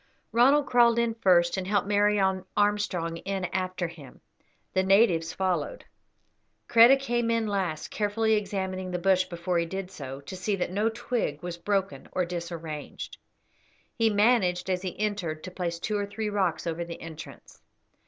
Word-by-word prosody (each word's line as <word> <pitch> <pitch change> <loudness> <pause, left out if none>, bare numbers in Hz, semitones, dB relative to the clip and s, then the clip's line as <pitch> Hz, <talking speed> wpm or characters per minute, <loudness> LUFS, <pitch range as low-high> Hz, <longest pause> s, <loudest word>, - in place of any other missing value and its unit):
Ronald 275 +5 +5
crawled 235 -2 +4
in 235 -1 +1
first, 180 -5 +3
and 185 -1 -3
helped 200 -1 +1
Mary 205 0 +3 0.4
Armstrong 205 -5 +1
in 195 +1 -3
after 185 -1 -1
him; 155 -6 -13 0.5
the 190 - +3
natives 190 -4 +3
followed. 190 - -2 0.8
Kreta 235 +4 +7
came 240 -3 -1
in 230 -1 +1
last, 190 -7 -2
carefully 220 +1 +1
examining 190 -3 -2
the 180 - -2
bush 185 +1 +3
before 175 0 -2
he 170 - 0
did 190 +1 -5
so, 135 -6 -7
to 140 +7 -8
see 185 +3 -1
that 180 -2 -2
no 210 +4 +1
twig 225 -9 -3
was 175 -1 -4
broken 195 +1 -2
or 180 - +1
disarranged. 170 -3 -6 0.8
He 225 -2 +2
managed 205 -4 +2
as 180 -1 0
he 185 -1 -6
entered 200 -7 -2
to 185 - -7
place 175 -2 -3
two 205 +4 -2
or 200 - -2
three 210 +1 -3
rocks 190 -5 0
over 170 0 -2
the 170 0 -8
entrance. 160 -1 -11
190 Hz, 165 wpm, -27 LUFS, 175-210 Hz, 0.8 s, Kreta